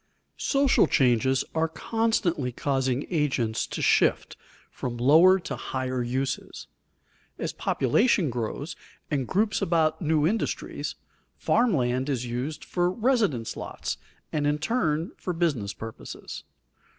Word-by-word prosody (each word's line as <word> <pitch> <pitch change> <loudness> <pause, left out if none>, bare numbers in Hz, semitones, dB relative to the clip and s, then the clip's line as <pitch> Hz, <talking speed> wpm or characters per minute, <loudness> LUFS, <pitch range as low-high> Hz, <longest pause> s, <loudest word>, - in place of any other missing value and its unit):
Social 275 -2 +3
changes 130 +1 +3
are 160 0 +1
constantly 180 - 0
causing 135 +1 -1
agents 135 -9 0
to - - -4
shift - - +2 0.4
from 120 -2 -5
lower 160 +10 +6
to - - -4
higher 130 -1 -3
uses. 130 +3 -3 0.7
As - - -3
population 165 - +2
grows 125 +7 -4 0.4
and 135 -4 0
groups 210 +2 +1
about 160 -2 +1
new 155 -2 +2
industries, 215 +7 -2 0.4
farm 235 -5 +2
land 130 +1 0
is 125 -3 -1
used 125 +6 -4
for 175 0 +1
residence 205 - +1
lots, - - -5 0.3
and 145 -1 +1
in 150 0 +2
turn 160 -2 0
for 180 - -3
business 145 - 0
purposes. 110 0 -8
150 Hz, 120 wpm, -26 LUFS, 130-175 Hz, 0.7 s, lower